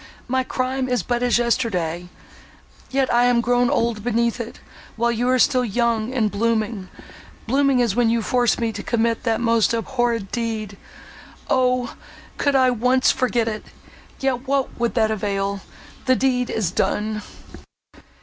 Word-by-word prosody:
My 260 +1 +1
crime 255 0 -2
is 245 -6 0
but 240 -1 -1
as 245 -1 +3
yesterday.—Yet 230 +3 -3
I 240 +1 +4
am 245 -1 +3
grown 245 +1 +2
old 230 -3 0
beneath 235 0 0
it; 235 - -6 0.4
while 235 +1 +1
you 240 +2 0
are 255 - +3
still 255 0 +3
young 235 0 0
and 225 -5 0
blooming—blooming 230 +5 -1
as 220 -4 0
when 240 -1 +3
you 230 0 +1
forced 245 0 +1
me 230 -1 0
to - - -6
commit 230 -1 0
that 225 -2 +1
most 230 0 +2
abhorred 230 -3 -1
deed! 220 -4 -3 0.8
O! 250 -2 +1 0.5
could 285 -1 +2
I 260 -1 +4
once 250 +2 +3
forget 245 -2 0
it!—yet 250 +4 -5
what 275 -1 0
would 235 -1 0
that 220 -2 +2
avail?—the 200 +4 -3
deed 250 -2 +1
is 200 -6 -1
done!" 215 +2 -1
235 Hz, 140 wpm, -22 LUFS, 220-250 Hz, 0.8 s, I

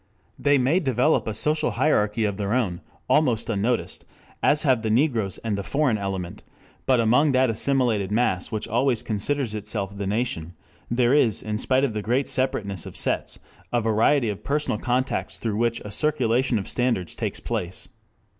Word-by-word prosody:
They 145 0 +3
may 135 +8 +2
develop 135 -3 +1
a 110 - -2
social 150 +6 +2
hierarchy 115 -6 +2
of 100 -2 -2
their 100 0 -2
own, 100 -9 -1 0.3
almost 125 -7 +2
unnoticed, 115 +4 -1 0.4
as 150 +1 +3
have 130 -6 +3
the 110 - -2
Negroes 115 - +1
and 110 -2 -1
the 100 - -3
"foreign 130 0 0
element," 95 -3 -4 0.5
but 130 -2 +4
among 125 +6 +3
that 130 -2 +3
assimilated 115 -5 +1
mass 105 -5 0
which 110 -2 -3
always 120 +1 +1
considers 115 +3 -2
itself 105 -2 -4
the 100 -1 -4
"nation," 100 -6 -2 0.4
there 120 +1 +2
is 120 -8 +2
in 105 0 -3
spite 130 +2 +2
of 135 -6 0
the 105 - -3
great 125 +6 0
separateness 100 -8 0
of - - -4
sets, - - 0 0.3
a 120 - +2
variety 115 +3 +2
of 105 0 -6
personal 145 -6 -1
contacts 130 +1 -1
through 110 -3 -3
which 115 0 0
a 105 - -8
circulation 125 -1 +1
of 100 - -4
standards 120 -8 0
takes - - -3
place. 90 +1 -3
115 Hz, 175 wpm, -24 LUFS, 105-130 Hz, 0.5 s, but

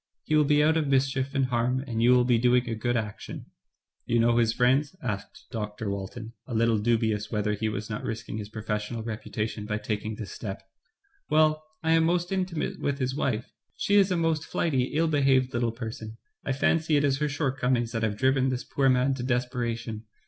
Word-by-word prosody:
He 155 - 0
will 150 -1 +5
be 150 +1 +4
out 160 +1 +4
of 155 -3 0
mischief 135 0 +1
and 135 -1 +3
harm, 125 +1 0
and 115 -4 -2
you 120 - +5
will 125 0 +6
be 120 -2 +3
doing 125 +1 +3
a 115 - -2
good 120 +2 0
action." 105 -2 -5 0.6
"You 120 - +2
know 115 +1 +4
his 115 -2 +3
friends?" 130 +7 +2
asked 105 -5 -5
Dr. 105 -2 -4
Walton, 110 +4 -6
a 120 - -4
little 115 -1 +3
dubious 110 -1 +1
whether 105 0 0
he 110 +1 -1
was 105 0 -4
not 105 -1 -5
risking 110 -1 -4
his 105 -1 -6
pro 110 0 -7
fessional 105 +1 -3
reputation 110 -1 -4
by 105 -1 -1
taking 105 0 -3
this 105 -2 -7
step. 100 -3 -6 0.7
"Well, 155 0 +3 0.2
I 160 - +2
am 165 0 +5
most 175 +1 +1
intimate 185 -4 -2
with 140 -1 -1
his 130 -1 -1
wife. 125 -5 -2 0.2
She 200 - -1
is 200 -1 +6
a 180 - +1
most 165 -2 +1
flighty, 135 -7 0
ill 160 +5 0
behaved 135 -4 +3
little 120 -1 +1
person. 110 -1 -7 0.3
I - - -2
fancy 155 +3 +2
it 145 - +2
is 135 -1 +2
her 150 -1 0
shortcomings 130 -5 0
that 115 - -2
have 105 -2 -1
driven 130 +1 +2
this 130 -1 -2
poor 135 -1 +1
man 130 +1 +3
to 130 - -5
desperation. 120 -3 -2
125 Hz, 205 wpm, -27 LUFS, 110-140 Hz, 0.7 s, will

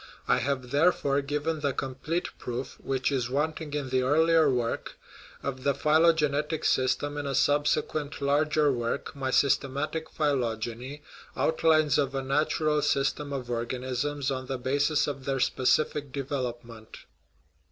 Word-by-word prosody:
I - - +3
have, 130 -3 -2
therefore, 145 -2 +2
given 150 +3 -2
the 140 -2 0
complete 135 +8 -3
proof, 125 +2 -5
which 135 +1 -1
is 125 -3 -1
wanting 150 +2 -2
in 140 -3 -3
the 130 0 +2
earlier 160 +3 +4
work, 120 -3 -2 0.5
of 130 -2 -4
the 140 -1 +2
phylogenetic 155 -1 +2
sys 130 0 +2
tem 145 0 -4
in 145 - -4
a 135 - -1
subsequent 145 +1 +1
larger 150 +1 +2
work, 120 +3 -3
my 135 -1 -2
Systematic 140 +4 +1
Phylog 125 -8 0
eny 125 +5 -8 0.4
(outlines 155 -2 +3
of 135 -1 0
a 135 - -1
natural 150 +2 +1
system 140 +1 0
of 130 -3 -4
organisms 130 +4 -2
on 130 -1 -4
the 135 -1 -2
basis 145 +4 +1
of 135 -2 -5
their 135 -1 -1
specific 140 +3 +1
development). 120 -5 -5
140 Hz, 140 wpm, -28 LUFS, 130-150 Hz, 0.5 s, earlier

